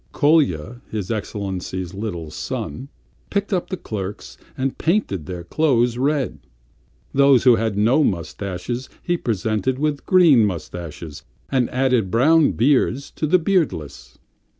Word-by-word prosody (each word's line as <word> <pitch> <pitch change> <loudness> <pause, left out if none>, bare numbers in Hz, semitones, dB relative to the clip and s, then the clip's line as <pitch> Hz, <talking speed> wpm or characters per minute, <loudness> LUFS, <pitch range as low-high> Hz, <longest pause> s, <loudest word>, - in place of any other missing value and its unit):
Kolya, 130 - +2
his 105 -2 -4
Excellency's 95 -4 -4
little 90 -6 -5
son, 80 - -5 0.4
picked 200 +1 -1
up 180 - -1
the 185 - -3
clerks 100 - -6 0.2
and 130 0 -2
painted 160 - 0
their 90 -2 -6
clothes 120 - +1
red. 135 - -1 0.7
Those 140 -2 +5
who 125 -3 +6
had 110 -3 -1
no 120 +9 +4
moustaches 100 - -3
he 175 - 0
presented 110 - -1
with 145 0 -2
green 170 - +6
moustaches 85 -4 -5 0.3
and 130 -3 +1
added 125 -6 +1
brown 150 - +4
beards 135 +2 +1
to 155 - -2
the 180 +5 +5
beardless. 155 - -2
120 Hz, 125 wpm, -21 LUFS, 95-145 Hz, 0.7 s, who